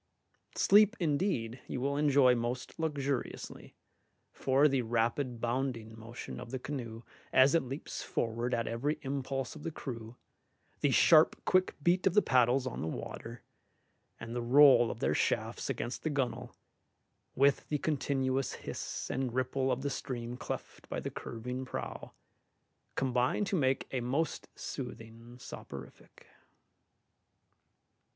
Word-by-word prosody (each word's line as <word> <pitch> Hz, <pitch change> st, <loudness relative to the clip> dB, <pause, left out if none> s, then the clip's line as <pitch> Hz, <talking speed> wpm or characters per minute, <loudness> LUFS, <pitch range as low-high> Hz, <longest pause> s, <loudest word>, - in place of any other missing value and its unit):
Sleep, 210 Hz, +3 st, +6 dB
indeed, 140 Hz, -, 0 dB
you -, -, -3 dB
will 140 Hz, +2 st, 0 dB
enjoy 140 Hz, -3 st, +5 dB
most 120 Hz, +4 st, -3 dB
luxuriously, 140 Hz, -5 st, -3 dB, 0.6 s
for 135 Hz, +3 st, +3 dB
the 135 Hz, -3 st, +1 dB
rapid 120 Hz, +2 st, 0 dB
bounding 120 Hz, -2 st, -2 dB
motion 115 Hz, +2 st, -8 dB
of -, -, -8 dB
the 130 Hz, -, -3 dB
canoe 120 Hz, -4 st, -6 dB, 0.3 s
as 130 Hz, +2 st, +6 dB
it 165 Hz, -, +4 dB
leaps 135 Hz, +4 st, -6 dB
forward 115 Hz, +2 st, -2 dB
at 115 Hz, -2 st, 0 dB
every 140 Hz, +7 st, -1 dB
impulse 135 Hz, -1 st, -3 dB
of 155 Hz, -, -10 dB
the 165 Hz, -, -3 dB
crew, 115 Hz, -6 st, -7 dB, 0.6 s
the -, -, +2 dB
sharp -, -, +5 dB
quick 185 Hz, 0 st, +3 dB
beat 180 Hz, +3 st, +3 dB
of 185 Hz, -, +1 dB
the 210 Hz, -, +7 dB
paddles 125 Hz, +1 st, +3 dB
on 130 Hz, -, -4 dB
the 80 Hz, -, -2 dB
water, 115 Hz, +8 st, -6 dB, 0.8 s
and 115 Hz, +1 st, -6 dB
the 120 Hz, -, -1 dB
roll 130 Hz, -1 st, +7 dB
of -, -, -6 dB
their -, -, +2 dB
shafts -, -, 0 dB
against 120 Hz, -, -3 dB
the 155 Hz, -, -1 dB
gunwale, 125 Hz, -4 st, -2 dB, 0.8 s
with 140 Hz, +1 st, +3 dB
the 150 Hz, -, +1 dB
continuous 135 Hz, -3 st, 0 dB
hiss -, -, -5 dB
and 130 Hz, -2 st, -2 dB
ripple 130 Hz, +1 st, 0 dB
of 125 Hz, +1 st, -1 dB
the 140 Hz, -, -1 dB
stream 120 Hz, -3 st, -4 dB
cleft -, -, -7 dB
by -, -, -2 dB
the -, -, -4 dB
curving 125 Hz, +3 st, -5 dB
prow, 130 Hz, -, -6 dB, 0.8 s
combine 130 Hz, +7 st, +1 dB
to 195 Hz, -, -1 dB
make 135 Hz, -5 st, +1 dB
a 130 Hz, -, -1 dB
most 140 Hz, +7 st, -1 dB
soothing 120 Hz, -2 st, -7 dB
soporific. 70 Hz, -, -10 dB
130 Hz, 140 wpm, -32 LUFS, 120-140 Hz, 0.8 s, the